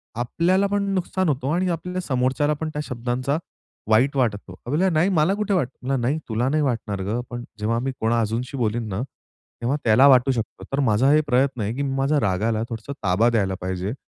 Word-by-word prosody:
आपल्याला 170 - +1
पण 200 0 0
नुकसान 185 -1 0
होतो 135 -1 -1
आणि 180 +3 +1
आपल्या 180 +2 -3
समोरच्याला 130 0 +1
पण 160 - -1
त्या 150 - -2
शब्दांचा 125 +3 -2 0.5
वाईट 125 +6 +3
वाटतं. 105 -7 -1
त्या 105 - -12
बोलल्या, 180 +6 +2
"नाही 170 +2 +2
मला 170 0 +2
कुठे 210 -1 -1
वाटतं?" 135 -5 -1
"नाही 130 +6 +1
तुला 120 +4 0
नाही 155 +1 +1
वाटणार 115 -7 -2
गं. 110 +5 -1
पण 120 -1 -6 0.2
जेव्हा 115 +2 0
मी 135 +2 -2
कोणा 115 +1 +1
अजूनशी 115 +5 -3
बोलीन 115 -1 -1
ना, 95 +2 -3 0.6
तेव्हा 130 +5 0
त्याला 120 +5 +6
वाटू 130 -1 +5
शकतो." 115 -3 -4
तर 140 - +1
माझा 120 +1 +3
हे 155 - +5
प्रयत्न 130 -2 +1
आहे, 105 +3 -1
की 140 - -3
मी 135 -1 -2
माझ्या 135 +2 +2
रागाला 110 +3 0
थोडसं 115 +4 -6
ताबा 100 +5 +3
द्यायला 100 -5 +1
पाहिजे 95 +3 -3
125 Hz, 200 wpm, -23 LUFS, 115-150 Hz, 0.6 s, त्याला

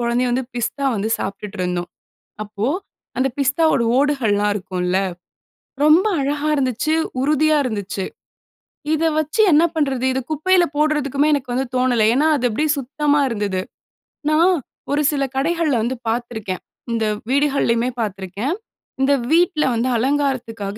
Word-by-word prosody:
கொழந்தையும் 240 +1 +1
வந்து 255 +2 0
பிஸ்தா 270 +4 -2
வந்து 210 +2 -2
சாப்பிட்டுட்டு 200 +1 -6
இருந்தோம். 180 -1 -2 0.5
அப்போ, 210 +2 -3 0.5
அந்த 260 - +2
பிஸ்தாவோட 280 -1 +2
ஓடுகள்லாம் 225 -8 +2
இருக்கும்ல, 185 -1 -1 0.9
ரொம்ப 315 +7 +5 0.2
அழகாக 290 +2 0
இருந்துச்சு, 260 +3 0 0.3
உறுதியா 305 +2 +3
இருந்துச்சு. 200 -4 -3 0.9
இத 315 +1 0
வச்சு 310 +7 -1
என்ன 305 +3 +6
பண்றது? 270 -5 0
இத 265 - -1
குப்பையில 355 +4 +3
போடுறதுக்குமே 295 -2 +1
எனக்கு 265 -3 -3
வந்து 265 +1 0
தோணல. 250 -3 +2
ஏன்னா, 290 +5 +2
அது 250 - 0
அப்படியே 300 +8 0
சுத்தமா 290 +2 +1
இருந்தது. 205 -5 -2 0.7
நான், 335 +4 +4 0.4
ஒரு 290 - +2
சில 280 -2 0
கடைகள்ல 315 -1 +1
வந்து 245 +3 -1
பாத்துருக்கேன். 225 -5 -3 0.3
இந்த 225 -1 0 0.3
வீடுகள்லயுமே 270 -4 +2
பாத்துருக்கேன். 205 - -3 0.5
இந்த 270 +1 +4 0.2
வீட்ல 330 -2 +3
வந்து, 235 +3 0
அலங்காரத்துக்காக 245 -6 -1
260 Hz, 125 wpm, -20 LUFS, 220-295 Hz, 0.9 s, என்ன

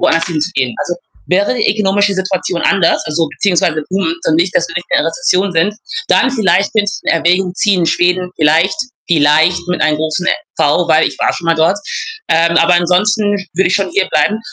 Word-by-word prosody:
woanders 165 0 +2
hinzugehen. 150 -7 -2
Also, 175 - -3 0.3
wäre 195 +3 +1
die 230 - +1
ökonomische 205 -1 +1
Situation 185 -2 -2
anders, 190 -4 +2
also 155 0 -1
beziehungsweise 170 -5 0
Boom, 185 -3 -1
dann 160 - +1
nicht 175 +2 0
dass - - +1
wir 165 - -9
nicht 175 - -5
mehr - - +2
in - - -1
der 165 - 0
Rezession 195 -3 0
sind, 175 +5 +1 0.3
dann 265 - +3
vielleicht 200 -6 +1
könnte 205 -2 +1
ich - - -7
in - - 0
Erwägung 180 +2 +1
ziehen, 195 -3 +1
Schweden 180 +2 0
vielleicht 160 - +2 0.3
vielleicht 160 +2 +3
mit 180 - -2
einem 155 0 +2
großen 155 +3 -3
e - - +3 0.3
V, 160 +4 +1
weil 160 0 +4
ich - - -5
war - - +1
schon 170 - -7
mal 165 - +3
dort. 165 +5 +1 0.5
Ähm, 170 +1 +2
aber 170 +2 +4
ansonsten 185 +4 +1 0.2
würde 185 +1 +2
ich 180 - 0
schon 195 -1 0
hierbleiben. 200 +2 0
180 Hz, 200 wpm, -14 LUFS, 165-195 Hz, 0.5 s, weil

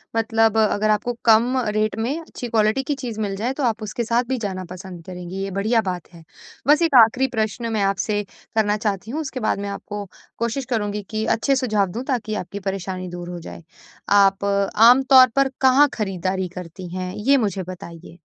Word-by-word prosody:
मतलब 225 -1 +2
अगर 215 -1 +2
आपको 215 +3 +1
कम 235 +3 +4 0.2
रेट 215 -1 +1
में 260 +8 -1
अच्छी 315 -6 -8
क्वालिटी 220 +3 +2
की 290 +2 -2
चीज़ 245 -5 -6
मिल 200 -2 -2
जाए, 230 +6 -2
तो 280 - -4
आप 225 -3 0
उसके 215 +3 -3
साथ 235 +2 +1
भी 260 - 0
जाना 195 -5 -4
पसंद 180 -1 -9
करेंगी, 180 +1 -6
ये 195 - -4
बढ़िया 215 +4 +1
बात 180 -4 -4
है। 165 -1 -14 0.4
बस 295 +3 +5
एक 330 -4 +2
आखिरी 255 +4 +1
प्रश्न 220 +2 -2
मैं 215 - 0
आपसे 200 +2 0 0.3
करना 210 -1 +2
चाहती 210 0 -3
हूँ, 310 +4 -2
उसके 270 -4 -5
बाद 215 -3 0
मैं 200 0 -4
आपको 205 +1 -6 0.3
कोशिश 235 +3 -2
करुँगी 210 -4 -2
कि 220 0 -2
अच्छे 275 +5 +1
सुझाव 215 -7 +1
दूँ, 235 +7 -4
ताकि 225 -5 -2
आपकी 200 0 -5
परेशानी 190 -1 -4
दूर 175 0 -7
हो 175 -1 -6
जाए। 170 - -10 0.5
आप 200 -1 +4 0.3
आमतौर 255 +3 +7
पर 275 0 +3
कहाँ 265 +2 +6
ख़रीदारी 190 -2 -2
करती 180 0 -8
हैं? 185 0 -4
ये 270 +7 +3
मुझे 200 -6 -1
बताइए। 175 -2 -10
215 Hz, 195 wpm, -22 LUFS, 195-240 Hz, 0.5 s, आमतौर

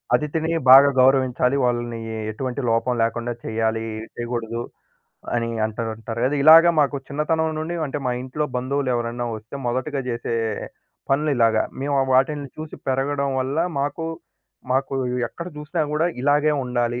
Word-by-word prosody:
అతిథిని 155 +4 -1 0.2
బాగా 135 +2 +10
గౌరవించాలి. 130 0 +3
వాళ్ళనీ 120 -1 -1 0.3
ఎటువంటి 130 +4 -4
లోపం 115 +2 +1
లేకుండా 120 +1 -1
చెయ్యాలి 110 0 -1 0.3
చేయగూడదు 120 -1 -3 0.7
అని 115 0 0 0.2
అంటా 110 +1 -3
ఉంటారు 115 +1 -6
గదా! 140 +3 +1
ఇలాగ 160 +2 +10 0.2
మాకు 140 0 +1
చిన్నతనం 160 +2 0
నుండి 165 +2 -3
అంటే, 145 +2 -4
మా - - +1
ఇంట్లో 140 +4 -3
బంధువులెవరన్నా 125 -2 -1
వస్తే 110 +5 -12
మొదటిగా 130 +4 -1
జేసే 115 -1 -3 0.8
పనులిలాగ 135 -6 +2 0.2
మేము 140 0 0 0.2
వాటిలిని 140 +2 +2
చూసి 155 0 -7
పెరగడం 140 +1 0
వల్ల, 135 +4 -2 0.2
మాకు 145 +3 -2 0.7
మాకు 135 +1 0 0.3
ఎక్కడ 170 - -8
జూసినా 155 +2 -2
గూడా 160 +3 +2 0.2
ఇలాగే 145 +2 +3
ఉండాలి, 120 -1 -1
130 Hz, 130 wpm, -22 LUFS, 120-145 Hz, 0.8 s, బాగా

